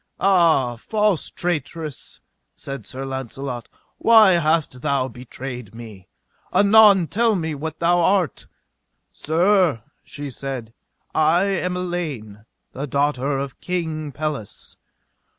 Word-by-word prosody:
Ah, 165 -11 +3
false 210 - 0
traitress, 160 -3 -4 0.3
said 135 -6 -8
Sir 135 +1 -6
Launcelot, 130 -2 -5 0.3
why 220 -4 +7
hast 160 -6 +1
thou 140 -3 0
betrayed 125 -2 -8
me? 110 -6 -11 0.4
anon 205 -3 +6
tell 225 +5 +1
me 160 -4 -2
what 155 +2 -5
thou 175 +1 +2
art. 180 - +1 0.7
Sir, 170 - +2 0.2
she 145 -1 -7
said, 125 -4 -6 0.4
I 160 +4 +3
am 180 -2 -1
Elaine, 145 - -5 0.3
the 140 +3 -5
daughter 140 0 0
of 135 -1 -6
King 160 -5 -3
Pelles. 145 -7 -5
150 Hz, 110 wpm, -22 LUFS, 130-175 Hz, 0.7 s, why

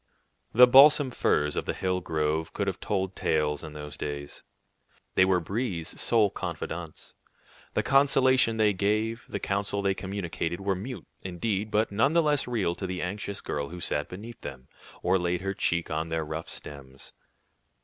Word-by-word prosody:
The 125 +2 +9
balsam 135 +2 +7
firs 75 -10 +1
of - - -2
the - - -2
hill 90 -1 -1
grove 80 -1 -1
could 100 - -1
have 95 -2 -3
told 95 -2 -2
tales 75 -1 0
in 75 -1 -8
those 75 -2 -8
days. 70 0 -6 0.7
They 95 - +5
were 95 -1 +3
Brie's 90 -2 -3
sole 110 -4 +3
confidants. 85 -2 -6 0.6
The - - +2
consolation 130 -4 +4
they 105 -2 +4
gave, 110 +4 0
the - - -3
counsel 100 0 -1
they 100 0 +2
communicated, 95 -3 -4
were 100 0 0
mute, 115 +8 -6 0.2
indeed, 100 +3 -2
but 105 +1 +1
none 110 +9 +2
the 170 0 +4
less 150 -3 +1
real 110 -8 0
to 95 - -5
the 90 -1 -3
anxious 100 +2 -4
girl 70 -1 -3
who 90 - -8
sat - - -2
beneath 110 +5 -9
them, 65 -1 -8 0.4
or 95 - +3
laid 90 0 -1
her 95 +1 -2
cheek 85 -3 -1
on 80 +1 -2
their 80 -1 -1
rough 80 +1 -5
stems. 70 -2 -8
95 Hz, 170 wpm, -28 LUFS, 80-110 Hz, 0.7 s, The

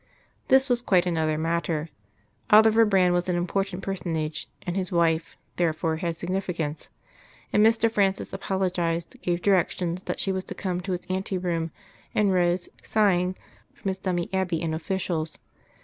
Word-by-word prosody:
This 265 +1 +5
was 245 -2 +1
quite 185 -6 +3
another 160 -3 0
matter. 165 -1 -1 0.6
Oliver 220 +1 +7
Brand 185 -4 +4
was 175 +1 0
an 180 - +1
important 195 +2 -1
personage, 165 -5 -3 0.2
and 175 -1 -2
his 190 0 -2
wife 165 -2 +1 0.2
therefore 160 -1 0
had 170 -1 -2
significance, 175 -4 -3 0.6
and 210 - +5
Mr. 225 +1 +4
Francis 200 -3 0
apologised, 175 -3 -1
gave 175 -1 -1
directions 180 -2 +1
that - - -3
she 195 - 0
was 190 0 -2
to - - -7
come 180 -2 -2
to 185 0 -3
his 180 - -4
ante 190 +1 -2
room, 170 -2 -1 0.5
and 205 -2 +3
rose, 175 0 +1
sighing, 185 -4 +2 0.4
from 195 - -3
his 190 0 -3
dummy 180 -3 -1
Abbey 185 -3 0
and 160 -1 -2
officials. 165 -2 -2
180 Hz, 155 wpm, -26 LUFS, 170-195 Hz, 0.6 s, Oliver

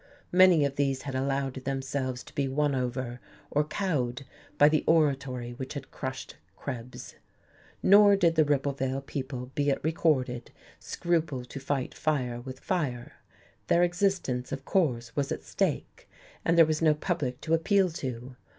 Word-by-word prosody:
Many 180 -4 +6
of 140 -1 -3
these 135 -2 0
had 140 -2 -5
allowed 135 0 -1
themselves 130 -1 -3
to - - -15
be 140 -1 0
won 145 +2 +1
over 125 -1 -3 0.3
or 150 - +2
cowed 140 -8 -2 0.3
by 145 - +7
the 155 0 +2
oratory 135 -6 +1
which 130 +3 -7
had 140 -2 -7
crushed 130 0 -6 0.2
Krebs. 125 -2 -7 0.7
Nor 205 +1 +7
did 175 -4 +3
the 160 -1 +4
Ribblevale 135 -2 -1
people 130 -2 -5
be 145 0 +1
it 135 - +1
recorded 135 -6 0 0.3
scruple 160 -7 -1
to 140 - -8
fight 135 -1 -2
fire 125 -6 -1
with 130 +1 -8
fire. 135 -10 -2 0.5
Their 175 - +4
existence, 175 -8 0
of 135 0 -5
course, 120 -11 0
was 140 -1 -1
at - - -3
stake, - - -2 0.3
and 165 +1 +2
there 165 - +9
was 155 0 -1
no 155 -2 +4
public 150 -6 -2
to 160 - -1
appeal 185 +3 +3
to. 125 -4 -6
140 Hz, 155 wpm, -28 LUFS, 130-160 Hz, 0.7 s, there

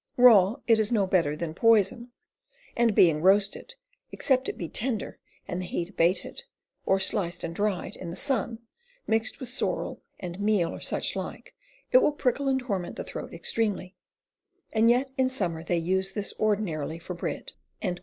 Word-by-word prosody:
Raw 225 -5 +7
it 225 -2 +4
is 220 +1 +1
no 210 -4 +3
better 170 -6 +1
than 155 0 -4
poyson, 230 +4 +3 0.7
and 235 -3 +2
being 160 -4 +5
roasted, 200 - +2 0.4
except 265 -2 +1
it - - -5
be 170 - -4
tender 225 +3 -2 0.3
and 180 -1 -3
the 180 - -5
heat 170 0 -3
abated, 185 - 0 0.5
or 195 - +3
sliced 190 -2 +1
and 165 - -4
dryed 200 0 -2
in 175 - -7
the 170 - -6
Sunne, 240 -5 0 0.5
mixed 225 +2 0
with 260 - -7
sorrell 255 - -3 0.2
and 180 0 -6
meale 205 -4 +1
or - - -8
such - - -2
like, - - -6 0.4
it - - +8
will 300 - +2
prickle 280 -1 0
and 265 -1 +2
torment 200 -8 -3
the - - -5
throat - - -7
extreamely, 205 -4 -2 0.8
and 225 +1 +4
yet 255 +3 +2
in 260 0 +3
sommer 175 -10 -2
they 170 0 0
vse 190 +3 -1
this 205 -2 -2
ordinarily 180 -8 -1
for 170 +2 -7
bread." 175 - -5
205 Hz, 170 wpm, -27 LUFS, 180-235 Hz, 0.8 s, it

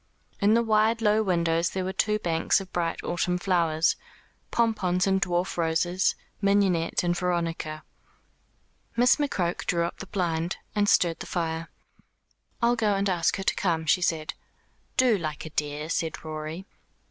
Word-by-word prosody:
In 210 +2 +4
the 235 - +3
wide 220 +1 +3
low 215 -1 +3
windows 170 -4 +1
there 190 - -3
were 190 +1 -3
two 210 +2 +1
banks 170 -4 +1
of 190 -1 -10
bright 170 -1 -2
autumn 180 +1 0
flowers, 170 -4 +2 0.5
pompons 195 -6 +1
and 190 0 +2
dwarf 175 +1 -1
roses, 175 +2 +1 0.3
mignonette 195 -5 +2
and 175 0 +1
veronica. 165 -3 -2 1.1
Miss 245 +1 +5
McCroke 185 - -1
drew 170 -1 +1
up 170 - -4
the 195 - -7
blind, 170 -3 -1 0.2
and 205 -1 +2
stirred 170 -4 +3
the - - -7
fire. 165 -1 -2 0.9
"I'll 240 +1 +4
go 215 -3 +1
and 200 +1 0
ask 170 -2 +1
her 195 - -4
to - - +2
come," 165 -4 -1
she 180 +3 +3
said. 160 -3 -1 0.6
"Do, 245 -6 +4
like 155 -2 -4
a 160 - -8
dear," 150 0 -2
said 165 -1 -3
Rorie. 155 +3 -5
180 Hz, 160 wpm, -26 LUFS, 165-200 Hz, 1.1 s, Miss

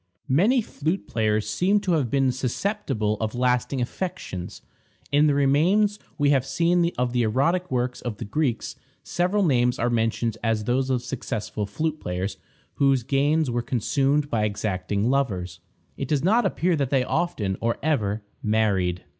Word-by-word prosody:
Many 225 - +4
flute 160 0 -3
players 110 -1 0
seem 195 +3 +2
to 185 - -1
have 150 -8 +1
been 135 +1 +2
susceptible 125 - -1
of 110 +1 -2
lasting 125 +1 +1
affections. 120 - -5 0.5
In 145 +2 +4
the 145 - +2
remains 180 +10 +3 0.2
we 145 -2 +3
have 135 -3 +3 0.5
of 125 0 0
the 125 - +2
erotic 140 +11 +1
works 125 -1 -1
of 120 -4 -4
the - - -6
Greeks, 120 +2 -1 0.3
several 180 +4 0
names 125 -6 +2
are 120 +1 0
mentioned 115 -1 0
as 115 -2 +1
those 130 +4 0
of 125 -2 0
successful 110 -5 -4
flute 155 +5 -2
players 90 +3 -3 0.4
whose 135 -3 +3
gains 140 +2 +1
were 120 0 0
consumed 135 +5 +1
by 115 -6 0
exacting 100 0 -1
lovers. 95 -11 -1 0.4
It - - -3
does 150 -2 0
not 215 +4 +3
appear 180 -1 +1
that 140 -3 0
they 135 -2 +2
often, 110 - -1
or 115 0 0
ever, 110 -9 0 0.2
married. 100 -5 +1
125 Hz, 155 wpm, -24 LUFS, 110-155 Hz, 0.5 s, Many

